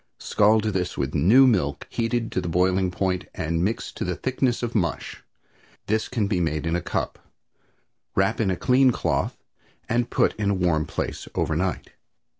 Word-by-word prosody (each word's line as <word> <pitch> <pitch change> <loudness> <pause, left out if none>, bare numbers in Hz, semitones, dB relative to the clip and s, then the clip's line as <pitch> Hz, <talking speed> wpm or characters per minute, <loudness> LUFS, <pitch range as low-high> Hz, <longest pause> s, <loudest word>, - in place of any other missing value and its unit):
Scald 105 +1 +3
this 95 -5 -2
with 70 0 -2
new 105 - +6
milk 80 - +1
heated 115 0 -1
to 95 - -1
the 85 - -4
boiling 90 +2 +2
point 90 0 -1
and 85 +2 -1
mix 115 +5 -2
to - - -5
the 90 -1 -2
thickness 130 -2 -1
of 120 0 -2
mush. 85 -7 -2 0.6
This 110 +1 0
can 115 -5 -1
be 100 -2 0
made 80 -2 -1
in 80 +1 0
a 90 - -1
cup. - - -3 1.0
Wrap 100 +4 +1
in 105 - +1
a 95 - +1
clean 130 +5 +4
cloth 125 - -1 0.5
and 120 +1 0
put - - +2
in 105 -2 0
a 100 - +2
warm 85 -4 +1
place - - -4
overnight. 85 +4 -1
95 Hz, 175 wpm, -24 LUFS, 85-115 Hz, 1.0 s, new